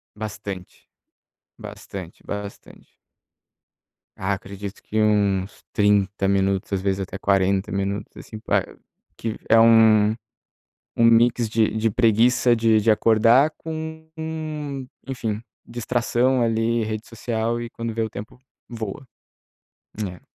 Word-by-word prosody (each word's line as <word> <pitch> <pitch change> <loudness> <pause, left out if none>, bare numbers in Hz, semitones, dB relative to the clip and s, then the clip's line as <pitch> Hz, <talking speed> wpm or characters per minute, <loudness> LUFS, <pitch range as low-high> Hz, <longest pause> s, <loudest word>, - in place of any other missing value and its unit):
Bastante. 105 -3 -7 0.7
Bastante, 95 -3 -9
bastante. 105 0 -8 1.3
Ah, 95 +1 -1
acredito 100 +1 -8
que 110 0 -2
uns 100 -2 +1
30 100 -1 +2
minutos, 100 0 0
às 95 - 0
vezes 100 0 0
até 95 0 -5
40 95 0 +1
minutos, 100 +1 -3
assim, 110 - -9
pra - - +1
eu - - -16 0.4
que 115 -1 -4
é 115 - +6
um 110 -2 +6 0.9
um 115 - +2
mix 115 0 +4
de 110 0 +2
de 110 +1 +1
preguiça 120 +2 +3
de 110 -1 +3
de 110 - +4
acordar 115 +7 +4
com, 160 0 -7 1.0
enfim, 110 -5 -3 0.2
distração, 120 +2 0
ali, 115 0 +1
rede 110 0 -4
social, 115 0 -2
e 120 - -6
quando 115 -1 -5
vê, 115 - -2
o 110 - -1
tempo 105 +4 -9 0.3
voa. 115 +2 -6 1.0
É. 90 -1 -11
110 Hz, 120 wpm, -23 LUFS, 100-115 Hz, 1.3 s, é